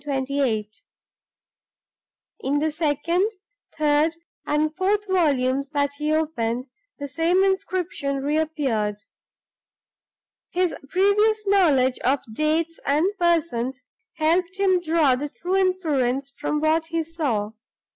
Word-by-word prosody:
In 275 Hz, -2 st, -1 dB, 2.3 s
the 310 Hz, +2 st, 0 dB
second, 335 Hz, +5 st, 0 dB, 0.5 s
third, 305 Hz, +1 st, +2 dB, 0.3 s
and 305 Hz, +1 st, 0 dB
fourth 400 Hz, +2 st, +1 dB
volumes 275 Hz, -7 st, +1 dB
that 285 Hz, -1 st, +1 dB
he 300 Hz, +1 st, 0 dB
opened, 255 Hz, -6 st, -1 dB, 0.3 s
the 285 Hz, -, -5 dB
same 330 Hz, +7 st, +2 dB
inscription 365 Hz, -7 st, -1 dB
re 295 Hz, +2 st, 0 dB
appeared. 255 Hz, -10 st, -1 dB, 1.5 s
His 360 Hz, -1 st, 0 dB, 0.2 s
previous 420 Hz, +3 st, +2 dB
knowledge 300 Hz, -11 st, +3 dB
of 270 Hz, +2 st, +1 dB
dates 315 Hz, +5 st, 0 dB
and 315 Hz, +9 st, +1 dB
persons 275 Hz, -7 st, 0 dB, 0.3 s
helped 345 Hz, +4 st, +1 dB
him 375 Hz, -2 st, +3 dB
to 335 Hz, -, -11 dB
draw 305 Hz, -6 st, +4 dB
the 290 Hz, +3 st, -4 dB
true 360 Hz, +6 st, -3 dB
inference 290 Hz, -9 st, 0 dB
from 300 Hz, +2 st, -2 dB
what 320 Hz, +1 st, +2 dB
he 330 Hz, 0 st, -1 dB
saw. 280 Hz, -11 st, -2 dB
310 Hz, 110 wpm, -23 LUFS, 275-355 Hz, 2.3 s, draw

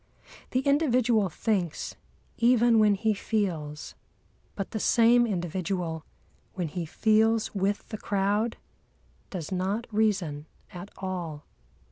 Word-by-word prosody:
The 255 Hz, -, +1 dB
individual 250 Hz, -, +2 dB
thinks, 180 Hz, -2 st, -2 dB, 0.4 s
even 235 Hz, -1 st, +5 dB
when 210 Hz, -1 st, +5 dB
he 220 Hz, +2 st, +1 dB
feels; 175 Hz, -9 st, -3 dB, 0.6 s
but 195 Hz, -, -4 dB
the 220 Hz, -, -3 dB
same 235 Hz, +2 st, +4 dB
individual, 175 Hz, -3 st, -2 dB, 0.5 s
when 175 Hz, -4 st, -2 dB
he 170 Hz, +1 st, -4 dB
feels 220 Hz, +4 st, +2 dB
with 200 Hz, 0 st, -1 dB
the 215 Hz, -, -6 dB
crowd, 205 Hz, +3 st, 0 dB, 0.7 s
does 175 Hz, -4 st, -6 dB
not 190 Hz, +5 st, -1 dB
reason 190 Hz, -9 st, 0 dB, 0.3 s
at 180 Hz, +3 st, -8 dB
all. 175 Hz, -6 st, -5 dB
200 Hz, 110 wpm, -27 LUFS, 180-225 Hz, 0.7 s, even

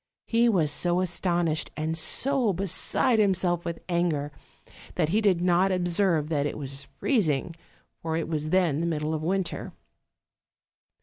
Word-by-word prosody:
He 235 Hz, +1 st, +3 dB
was 165 Hz, -9 st, +2 dB
so 175 Hz, +4 st, +1 dB
astonished 175 Hz, -3 st, 0 dB
and 160 Hz, +1 st, -2 dB
so 240 Hz, -, +2 dB
beside 200 Hz, +6 st, +1 dB
himself 185 Hz, -4 st, +1 dB
with 170 Hz, -1 st, -6 dB
anger 170 Hz, -5 st, 0 dB, 0.6 s
that 160 Hz, -4 st, +1 dB
he 210 Hz, +6 st, +2 dB
did 190 Hz, -5 st, +2 dB
not 180 Hz, +2 st, +3 dB
observe 175 Hz, -3 st, +1 dB
that 145 Hz, -3 st, 0 dB
it -, -, -5 dB
was 140 Hz, -1 st, -7 dB
freezing, 165 Hz, -, 0 dB, 0.5 s
for 160 Hz, -1 st, -2 dB
it 165 Hz, -, -2 dB
was 155 Hz, -1 st, -2 dB
then 170 Hz, -5 st, +2 dB
the 170 Hz, -, -1 dB
middle 155 Hz, -1 st, -2 dB
of 155 Hz, -, -2 dB
winter. 185 Hz, +2 st, -2 dB
170 Hz, 145 wpm, -26 LUFS, 155-190 Hz, 0.6 s, He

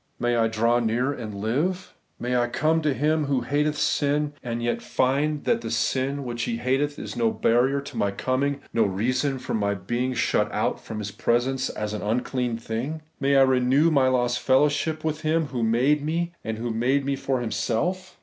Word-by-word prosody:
May 120 Hz, 0 st, +1 dB
I 115 Hz, -1 st, +3 dB
draw 115 Hz, +2 st, +2 dB
near, 120 Hz, +4 st, 0 dB
and 110 Hz, -6 st, -6 dB
live? 145 Hz, -, -1 dB, 0.3 s
May 125 Hz, +1 st, -1 dB
I 120 Hz, 0 st, +2 dB
come 155 Hz, +6 st, +1 dB
to 150 Hz, -1 st, +1 dB
Him 150 Hz, +4 st, +1 dB
who 140 Hz, -2 st, 0 dB
hateth 150 Hz, +4 st, 0 dB
sin, 145 Hz, 0 st, +1 dB
and 120 Hz, -1 st, -4 dB
yet 120 Hz, -, -1 dB
find 145 Hz, +3 st, 0 dB
that 230 Hz, -, +1 dB
the -, -, -5 dB
sin 135 Hz, +2 st, 0 dB
which 120 Hz, -2 st, -4 dB
He 115 Hz, -, -2 dB
hateth 135 Hz, +4 st, 0 dB
is -, -, -6 dB
no 115 Hz, -2 st, +2 dB
barrier 125 Hz, +5 st, +2 dB
to 140 Hz, -, -10 dB
my 100 Hz, -, +1 dB
coming, 135 Hz, +7 st, -1 dB
no 115 Hz, -, +2 dB
reason 125 Hz, +8 st, 0 dB
for -, -, -5 dB
my 100 Hz, -2 st, 0 dB
being 120 Hz, +7 st, -2 dB
shut -, -, +1 dB
out -, -, -1 dB
from 110 Hz, -, -6 dB
His 105 Hz, -1 st, -4 dB
presence 130 Hz, +5 st, 0 dB
as 105 Hz, 0 st, -4 dB
an 105 Hz, -, -4 dB
unclean 125 Hz, +2 st, -1 dB
thing? 125 Hz, +8 st, -4 dB, 0.2 s
May 140 Hz, 0 st, +2 dB
I 135 Hz, -, +7 dB
renew 130 Hz, +4 st, +3 dB
my 135 Hz, -4 st, +4 dB
lost 120 Hz, -1 st, +1 dB
fellowship 145 Hz, +3 st, +2 dB
with 155 Hz, -1 st, -2 dB
Him 160 Hz, +1 st, +1 dB
who 125 Hz, -3 st, -3 dB
made 125 Hz, +6 st, +2 dB
me, 170 Hz, +3 st, -1 dB
and 110 Hz, -1 st, -3 dB, 0.2 s
made 130 Hz, +5 st, +1 dB
me 140 Hz, 0 st, 0 dB
for 135 Hz, -1 st, -1 dB
Himself 120 Hz, -, -2 dB
130 Hz, 195 wpm, -25 LUFS, 115-145 Hz, 0.3 s, I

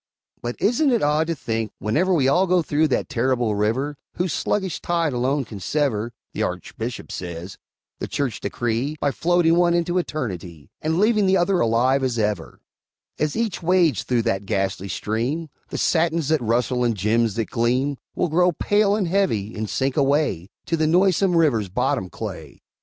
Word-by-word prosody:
But 120 Hz, 0 st, -3 dB
isn't 245 Hz, +8 st, +2 dB
it 235 Hz, -3 st, +2 dB
odd 150 Hz, +2 st, +2 dB
to 165 Hz, -, -1 dB
think, 115 Hz, -5 st, -3 dB
whenever 160 Hz, -, +1 dB
We 145 Hz, -7 st, +3 dB
all 180 Hz, +8 st, +3 dB
go 180 Hz, -1 st, +3 dB
through 155 Hz, +1 st, +2 dB
that 130 Hz, -, 0 dB
terrible 125 Hz, -3 st, 0 dB
River 120 Hz, +8 st, -1 dB, 0.2 s
Whose 180 Hz, -1 st, -1 dB
sluggish 190 Hz, -4 st, -1 dB
tide 170 Hz, -4 st, 0 dB
alone 130 Hz, +3 st, 0 dB
can 105 Hz, -2 st, -9 dB
sever 120 Hz, 0 st, -1 dB, 0.2 s
(The -, -, -3 dB
Archbishop -, -, -4 dB
says) 85 Hz, +1 st, -7 dB, 0.4 s
the -, -, -3 dB
Church 135 Hz, -7 st, -2 dB
decree, 120 Hz, +5 st, -2 dB
By 145 Hz, -, +1 dB
floating 170 Hz, +1 st, +2 dB
one 175 Hz, -1 st, +4 dB
into 175 Hz, +1 st, +1 dB
Eternity 90 Hz, -, -5 dB
And 160 Hz, +1 st, 0 dB
leaving 210 Hz, 0 st, +3 dB
the 190 Hz, 0 st, +4 dB
other 180 Hz, +1 st, +2 dB
alive 125 Hz, +4 st, +2 dB
as 125 Hz, -2 st, 0 dB
ever 105 Hz, -6 st, -2 dB, 0.6 s
As 150 Hz, -1 st, 0 dB
each 220 Hz, -7 st, -1 dB
wades 175 Hz, -3 st, +3 dB
through 120 Hz, -2 st, 0 dB
that 100 Hz, -4 st, -1 dB
ghastly 95 Hz, 0 st, -1 dB
stream, 125 Hz, -, -2 dB, 0.2 s
The -, -, -4 dB
satins 165 Hz, -2 st, +1 dB
that 155 Hz, -3 st, +2 dB
rustle 125 Hz, +2 st, +1 dB
and 115 Hz, -3 st, +1 dB
gems 110 Hz, +2 st, +1 dB
that 115 Hz, -2 st, -2 dB
gleam, 125 Hz, +4 st, +1 dB, 0.2 s
Will -, -, +1 dB
grow 180 Hz, +2 st, +3 dB
pale 205 Hz, +5 st, +2 dB
and 205 Hz, -4 st, 0 dB
heavy, 165 Hz, -, 0 dB
and 110 Hz, -1 st, -3 dB
sink 135 Hz, 0 st, -1 dB
away 140 Hz, -, +1 dB, 0.2 s
To 165 Hz, -, 0 dB
the 155 Hz, -1 st, +2 dB
noisome 180 Hz, +1 st, +3 dB
River's 120 Hz, -, +2 dB
bottom 95 Hz, 0 st, -1 dB
clay! 90 Hz, -10 st, -8 dB
140 Hz, 175 wpm, -23 LUFS, 115-170 Hz, 0.6 s, one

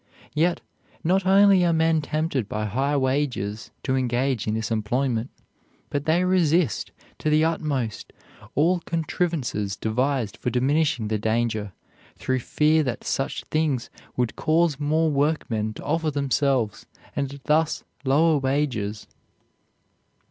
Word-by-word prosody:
Yet 170 Hz, +3 st, +1 dB, 0.4 s
not 185 Hz, +3 st, +2 dB
only 195 Hz, -1 st, +6 dB
are 170 Hz, -, +3 dB
men 160 Hz, -1 st, +2 dB
tempted 150 Hz, -6 st, -2 dB
by 105 Hz, 0 st, -2 dB
high 135 Hz, +8 st, 0 dB
wages 130 Hz, -6 st, -1 dB
to 130 Hz, -, 0 dB
engage 125 Hz, -2 st, 0 dB
in 110 Hz, -, 0 dB
this 110 Hz, +1 st, -3 dB
employment, 115 Hz, +2 st, 0 dB, 0.6 s
but 145 Hz, 0 st, -2 dB
they 165 Hz, +3 st, +3 dB
resist 175 Hz, -, +2 dB, 0.3 s
to 155 Hz, -, 0 dB
the 155 Hz, +1 st, +4 dB
utmost 145 Hz, -8 st, -2 dB, 0.4 s
all 170 Hz, +6 st, +3 dB
contrivances 160 Hz, -, -2 dB
devised 120 Hz, +2 st, -1 dB
for -, -, -2 dB
diminishing 130 Hz, 0 st, +1 dB
the 110 Hz, -1 st, 0 dB
danger, 110 Hz, -1 st, -1 dB, 0.5 s
through 130 Hz, 0 st, -1 dB
fear 155 Hz, +5 st, +2 dB
that 125 Hz, -5 st, -3 dB
such 135 Hz, -, -2 dB
things 155 Hz, -6 st, 0 dB, 0.3 s
would 125 Hz, -2 st, 0 dB
cause 160 Hz, -2 st, +2 dB
more 155 Hz, +2 st, +2 dB
workmen 140 Hz, -7 st, 0 dB
to -, -, -9 dB
offer 160 Hz, +2 st, 0 dB
themselves 140 Hz, -5 st, 0 dB, 0.3 s
and 140 Hz, 0 st, -3 dB
thus 155 Hz, +1 st, +1 dB, 0.2 s
lower 150 Hz, +3 st, +3 dB
wages. 130 Hz, -7 st, -1 dB
140 Hz, 125 wpm, -24 LUFS, 120-160 Hz, 0.6 s, only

